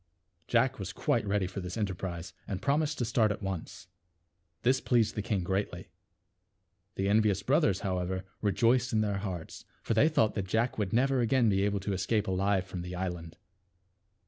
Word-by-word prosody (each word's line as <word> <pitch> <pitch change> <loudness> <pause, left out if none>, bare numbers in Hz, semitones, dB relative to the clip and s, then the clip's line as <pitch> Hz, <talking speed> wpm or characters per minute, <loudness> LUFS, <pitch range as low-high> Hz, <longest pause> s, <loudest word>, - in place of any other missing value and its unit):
Jack 130 +1 +2
was 95 0 -5
quite 115 -3 0
ready 100 -1 +1
for 95 +2 -5
this 90 +2 -5
enterprise, 95 -4 -4
and 95 -3 -3
promised 150 +5 +1
to 120 - 0
start 110 -2 +2
at 105 - -5
once. 95 0 -5 0.8
This 130 +2 +3
pleased 120 -4 +2
the 105 - -2
king 100 -3 -1
greatly. 95 +3 -3 1.0
The 95 - -1
envious 105 -2 +3
brothers, 130 - +2
however, 95 0 -2 0.2
rejoiced 120 +4 +2
in 110 - +3
their 100 -2 0
hearts; 90 -5 -6 0.2
for - - 0
they 135 +8 +5
thought 110 -9 +2
that 95 -2 -3
J 110 - 0
ack 115 0 0
would 100 -3 -1
never 135 +3 +2
again 120 0 +3
be 95 -1 +2
able 100 -1 0
to 100 +1 -2
escape 105 +3 0
alive 95 0 +1
from 90 -1 -6
the 90 +1 -6
island. 90 -3 -5
100 Hz, 180 wpm, -30 LUFS, 95-115 Hz, 1.0 s, they